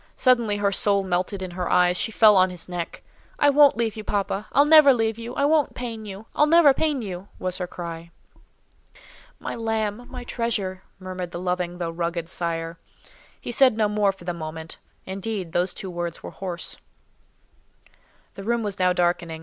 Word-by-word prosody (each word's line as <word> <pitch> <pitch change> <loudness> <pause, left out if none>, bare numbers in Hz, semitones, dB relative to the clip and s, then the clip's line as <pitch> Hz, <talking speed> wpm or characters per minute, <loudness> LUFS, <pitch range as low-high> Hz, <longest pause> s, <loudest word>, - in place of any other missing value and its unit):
Suddenly 235 -5 +2
her 200 -1 +1
soul 200 0 +2
melted 185 +1 -2
in 185 - -6
her 180 0 -3
eyes; 180 0 +4
she 225 - 0
fell 215 -1 +6
on 185 0 +5
his 180 -2 -7
neck:—"I 180 +10 -2
won't 285 -3 +6
leave 225 -3 -1
you, 215 - -6
papa; 200 0 -2
I'll 285 - +5
never 300 -3 +7
leave 225 -1 -1
you. 235 +2 -7
I 280 - +1
won't 300 -1 +2
pain 230 -3 -6
you! 200 +1 -8
I'll 300 - +4
never 320 -3 +6
pain 290 -3 -1
you!" 190 -1 -6
was 185 0 -3
her 180 - -3
cry. 170 -1 -7 1.3
"My - - -5
lamb! 225 0 -2
my 250 -1 -7
treasure!" 210 -6 -2 0.2
murmured 185 -2 -6
the 170 - -6
loving 180 -1 -2
though 170 -2 -3
rugged 170 0 -3
sire. 165 -2 -3 0.6
He - - -6
said 255 -1 +4
no 215 -2 +3
more 205 -1 +2
for 190 - -16
the 175 0 -3
moment; 160 -1 -7 0.3
indeed, 190 -2 -4
those 180 +2 +1
two 190 0 -7
words 170 -1 -5
were - - -7
hoarse. 180 -3 -6 1.6
The 195 - -9
room 235 +2 0
was 205 -2 -4
now 180 0 +3
darkening. 175 -2 0
195 Hz, 180 wpm, -24 LUFS, 175-225 Hz, 1.6 s, never